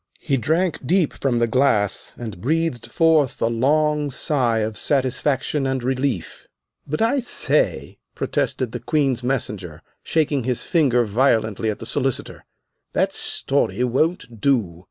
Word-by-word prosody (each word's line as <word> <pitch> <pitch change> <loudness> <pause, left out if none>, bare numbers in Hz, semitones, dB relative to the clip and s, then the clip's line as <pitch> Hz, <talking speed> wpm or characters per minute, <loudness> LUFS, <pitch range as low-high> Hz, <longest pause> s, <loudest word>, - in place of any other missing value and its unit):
He 140 - 0
drank 160 - 0
deep 170 +3 +2
from 130 -3 -1
the 120 - +3
glass, 115 -5 +1
and 110 -7 -7
breathed 160 -2 -1
forth 160 -5 +2
a - - +1
long 150 +5 +1
sigh 125 -3 0
of 110 0 -2
satisfaction 135 +2 0
and 130 -2 -2
relief. 130 - -2 0.4
"But 155 +9 -1
I 245 +5 +2
say," 385 - 0 0.2
protested 130 -4 -1
the 120 - -5
Queen's 130 +1 0
Messenger, 105 - -3 0.2
shaking 150 -4 0
his 125 0 -2
finger 130 -8 +2
violently 110 -1 +1
at 105 - -2
the - - -8
Solicitor, 135 -3 -2 0.5
"that - - +1
story 125 - 0
won't 125 - -1
do. 105 -12 +1
130 Hz, 135 wpm, -22 LUFS, 115-150 Hz, 0.5 s, the